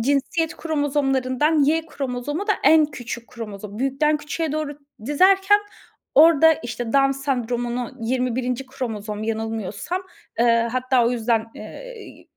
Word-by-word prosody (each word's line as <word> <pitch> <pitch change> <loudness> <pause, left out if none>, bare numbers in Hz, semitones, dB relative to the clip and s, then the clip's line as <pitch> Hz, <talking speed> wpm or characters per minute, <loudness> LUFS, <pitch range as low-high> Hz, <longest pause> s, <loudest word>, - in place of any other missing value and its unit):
cinsiyet 285 +6 0
kromozomlarından 290 -1 +1
Y 320 +3 +1
kromozomu 280 +6 -4
da 420 - +3
en 315 -1 +6
küçük 245 -4 -7
kromozom. 210 -3 -8
Büyükten 275 +4 +1
küçüğe 300 +1 -3
doğru 300 -2 -3 0.3
dizerken 385 +7 +4 0.6
orada, 320 +1 +7
işte, 235 -3 -5
Down 275 -1 +4
Sendromu’nu 245 -3 -2
21. 250 +1 -1
kromozom, 215 -5 -5
yanılmıyorsam, 225 - -3 0.4
ııı, 230 0 +3
hatta 255 0 +1
o - - +2
yüzden, 230 -2 0
eee, - - -11
260 Hz, 115 wpm, -22 LUFS, 235-300 Hz, 0.6 s, orada